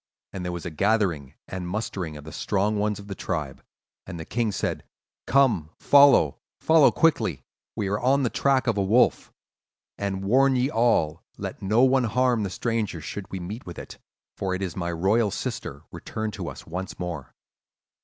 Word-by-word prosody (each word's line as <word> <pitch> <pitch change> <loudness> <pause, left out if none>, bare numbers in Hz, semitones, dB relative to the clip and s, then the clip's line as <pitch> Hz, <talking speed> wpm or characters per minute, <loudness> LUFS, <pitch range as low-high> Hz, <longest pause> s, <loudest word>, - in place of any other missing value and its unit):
And 95 - -5
there 90 - -3
was 85 -1 -6
a 85 - -4
gathering 85 -6 0
and 95 -1 -5
mustering 90 -5 -4
of 75 - -10
the 80 - -9
strong 105 +5 0
ones 105 0 0
of 100 - -10
the 100 - -4
tribe. 75 -8 -4 0.4
And 85 - -7
the 80 - -6
king 115 +1 -1
said, - - -2 0.4
'Come, 120 - +3
follow, 140 - +6 0.2
follow 160 -2 +6
quickly, 115 - +1 0.3
we 105 -3 -2
are 105 +2 -1
on 135 +2 +2
the 120 - 0
track 135 -2 +2
of 115 -5 +1
a - - +2
wolf. 110 +6 +2 0.7
I 100 - -1
warn 120 +8 +2
ye 130 +3 +1
all, 110 -10 +2 0.2
let - - -6
no 110 +5 +3
one 130 -1 +4
harm 125 0 +2
the 100 - -2
stranger 110 -2 -2
should 95 +5 -7
we 95 - -5
meet 100 +7 -7
with 85 - -8
it; - - -9 0.4
for 95 -1 -2
it 95 - -4
is 90 -4 -4
my 85 -2 -2
royal 100 +6 +2
sister, 70 -6 -5
returned 110 -1 -5
to - - -5
us - - -10
once 90 +3 -6
more! 85 -7 -6
100 Hz, 185 wpm, -25 LUFS, 90-120 Hz, 0.7 s, follow